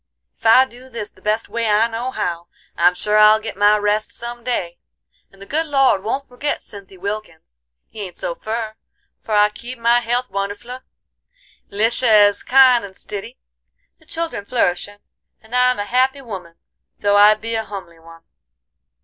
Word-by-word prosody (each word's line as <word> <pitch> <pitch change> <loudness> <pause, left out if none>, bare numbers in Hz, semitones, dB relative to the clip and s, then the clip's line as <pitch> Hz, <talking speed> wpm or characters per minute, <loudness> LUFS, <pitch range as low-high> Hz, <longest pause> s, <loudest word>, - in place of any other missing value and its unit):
Ef - - -22
I 255 +4 +7
do 255 +1 -15
this 230 -4 -7
the - - -24
best 215 +2 -1
way 230 -1 -2
I 210 +2 +4
know 235 +2 -3
how, 170 -8 -3 0.3
I'm 175 +1 +3
sure 210 +3 +1
I'll 215 +1 +7
get 220 - -7
my 205 +1 +4
rest 210 +1 0
some 240 0 -8
day, 180 -9 -3 0.5
and 195 - -21
the 195 - -11
good 320 +8 -1
Lord 270 -9 +3
won't 270 +6 -3
forgit 270 +4 -3
Cynthy 195 -2 -13
Wilkins. 185 - -7 0.3
He 215 - -10
ain't 185 -3 -8
so 170 - -3
fur, 220 +3 -4 0.5
for 215 - -2
I 210 0 +5
keep 240 +4 -9
my 235 +1 +3
health 245 +2 -2
wonderfle, 205 +6 -5 0.9
Lisha 220 0 +4
is 205 - -6
kind 255 -3 +5
and 195 -1 -10
stiddy, 210 +5 -8 0.6
the 315 - -24
children 330 -10 -4
flourishin', 205 -2 -1 0.4
and 220 +2 -18
I'm 250 0 +3
a 205 - -3
happy 260 +4 +1
woman 185 -8 -8 0.4
though 205 0 +1
I 210 +1 +7
be 225 +2 -6
a 225 0 -1
humly 190 -6 -9
one." 165 0 -16
215 Hz, 175 wpm, -19 LUFS, 200-245 Hz, 0.9 s, I